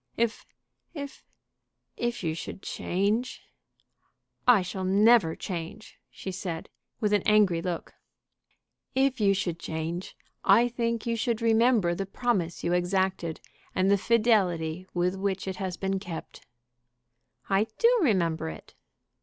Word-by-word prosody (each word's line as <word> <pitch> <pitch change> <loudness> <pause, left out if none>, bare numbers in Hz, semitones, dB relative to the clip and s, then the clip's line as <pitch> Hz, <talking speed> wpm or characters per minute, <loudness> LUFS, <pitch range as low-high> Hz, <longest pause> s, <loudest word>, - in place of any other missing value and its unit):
"If 230 -1 -1 0.5
if 285 -2 -7 0.7
if 240 -3 -2
you 160 -2 0
should 165 +4 -7
change 210 +7 -1 0.5
" - - -47
"I 190 - 0
shall 185 +1 -5
never 200 -2 +5
change!" 180 +4 -7
she 190 - -7
said, 180 -3 -5 0.3
with 210 -1 +1
an 205 - +4
angry 205 -6 +3
look. 175 -1 -4 1.0
"If 265 -1 +2
you 195 -1 +4
should 175 -4 -2
change, 165 +3 -4 0.3
I 230 +5 +6
think 230 -1 -2
you 230 -1 0
should 230 0 -1
remember 225 -5 +3
the 195 +2 -3
promise 195 -6 -1
you 170 - +1
exacted 180 -2 0 0.3
and 190 +1 +3
the - - +6
fidelity 185 -7 +2
with 180 +1 +1
which 195 0 -2
it 190 - -3
has 185 -2 -4
been 195 0 -1
kept." 175 -4 -8 1.0
"I 200 +2 +2
do 475 +1 +4
remember 170 - +1
it." 80 - -11
195 Hz, 135 wpm, -28 LUFS, 175-225 Hz, 1.0 s, I